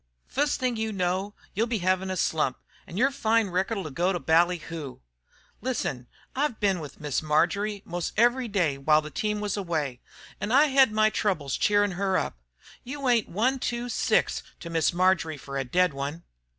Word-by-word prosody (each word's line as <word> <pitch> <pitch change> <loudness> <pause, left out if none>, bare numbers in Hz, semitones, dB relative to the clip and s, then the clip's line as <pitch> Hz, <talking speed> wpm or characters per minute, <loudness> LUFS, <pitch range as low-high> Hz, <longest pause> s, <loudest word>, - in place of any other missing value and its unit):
Fust 290 +2 0
thing 250 -3 0
you 220 0 -1
know, 190 +1 -1 0.2
you'll 225 +4 +1
be 235 -1 0
hevin' 185 0 0
a 185 - -2
slump, 155 -6 0 0.3
an' 170 - -8
yer 265 +5 +3
fine 225 -5 +1
record'll 190 +1 -1
go 175 +7 +1
to 175 - -1
bally 170 +3 +3
hoo. 160 -5 -7 0.6
Listen, 135 - -2 0.3
I've 275 -3 0
been 195 -3 +2
with 150 -3 -9
Miss 150 -3 -1
Marjory 195 +7 +1
most 175 0 -3
every 240 +2 +3
day 175 -10 0
while 155 +2 +4
the 155 - -8
team 210 +3 -1
was 210 -2 -1
away, 155 -10 -2 0.4
an' 205 - -3
I 290 +4 +5
hed 265 -3 +5
my 215 0 +3
troubles 160 -12 -1
cheerin' 205 -1 +3
her 190 +1 0
up. - - -2 0.5
You 275 +1 -4
ain't 235 -4 +3
one 250 +9 +1
two 240 0 -2
six - - +1 0.2
to 170 - -7
Miss 165 -2 +2
Marjory 175 -3 +2
fer 140 0 -8
a - - 0
dead 180 +6 +2
one!" 140 +5 -5
190 Hz, 185 wpm, -27 LUFS, 165-225 Hz, 0.6 s, I